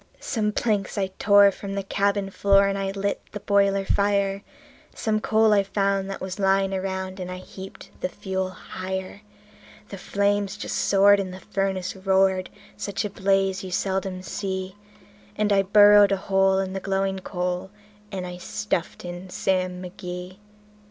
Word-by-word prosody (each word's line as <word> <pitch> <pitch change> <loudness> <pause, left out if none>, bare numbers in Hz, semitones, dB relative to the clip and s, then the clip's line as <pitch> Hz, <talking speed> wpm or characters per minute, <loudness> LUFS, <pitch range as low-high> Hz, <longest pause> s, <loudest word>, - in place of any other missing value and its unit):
Some 215 -5 -1
planks 210 -3 -1
I 190 -1 -1
tore 200 -1 +6
from 195 +1 -7
the 200 - -2
cabin 200 0 0
floor, 200 0 +4
and 195 - -1
I 195 0 -2
lit 200 +1 -2
the 205 - -4
boiler 200 -1 +2
fire; 200 0 +1 0.5
Some 215 -2 0
coal 220 0 +3
I 200 - +5
found 195 0 0
that 195 - -5
was 190 +1 -5
lying 195 0 +2
around, 190 0 -3
and 180 -1 -5
I 185 - -5
heaped 190 +1 -11
the 180 - -1
fuel 190 +1 -3
higher; 190 +1 -6 0.7
The 195 - -8
flames 200 +1 0
just - - -4
soared, 200 +1 +5
and 190 -2 -3
the 185 - -9
furnace 190 -1 -2
roared 190 -1 +2 0.3
such 200 +1 -3
a 205 - -4
blaze 195 -1 +1
you 190 - -6
seldom 190 0 -2
see; 190 +1 -4 0.6
And 210 -1 +1
I 195 - +5
burrowed 205 +1 +7
a 195 - +2
hole 195 0 +2
in 190 -1 -1
the 195 - -2
glowing 195 0 -1
coal, 180 0 -3 0.4
and 190 -2 -4
I 180 0 -7
stuffed 180 -2 -3
in 175 +1 -7
Sam 185 -1 -1
McGee. 180 0 -7
195 Hz, 165 wpm, -24 LUFS, 190-200 Hz, 0.7 s, burrowed